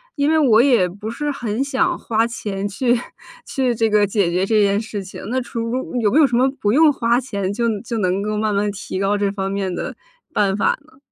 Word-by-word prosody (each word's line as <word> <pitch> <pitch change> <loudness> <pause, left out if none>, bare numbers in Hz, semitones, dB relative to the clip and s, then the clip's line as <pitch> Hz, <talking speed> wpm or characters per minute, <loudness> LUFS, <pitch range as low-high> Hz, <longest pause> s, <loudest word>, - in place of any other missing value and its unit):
因 285 0 +1
为 320 0 +3
我 235 -6 +5
也 240 -9 +4
不 205 +5 -7
是 295 +5 -3
很 245 -4 -3
想 275 -2 0
花 225 0 +1
钱 205 -4 -4
去 240 +4 +1 0.5
去 255 -3 0
这 225 0 +1
个 210 -1 +3
解 195 -3 +1
决 180 +2 +1
这 215 +1 +3
件 200 0 +2
事 215 -2 -5
情， 190 - -10
那 255 +4 -1
除 240 +2 -4
有 210 - +3
没 285 - +3
有 - - +7
什 240 -3 +1
么 260 +2 +3
不 205 - +2
用 305 +5 +5
花 235 -1 +2
钱 200 -7 -3
就 235 +3 -1 0.2
就 235 -1 -4
能 190 -1 0
够 210 0 -2
慢 215 -1 0
慢 205 +1 +1
提 195 -1 -6
高 195 +2 +1
这 200 -1 0
方 195 -1 -3
面 195 -2 -2
的 - - -4 0.4
办 195 -2 +2
法 205 - +1
呢？ 310 -4 -23
215 Hz, 250 characters per minute, -20 LUFS, 200-245 Hz, 0.5 s, 有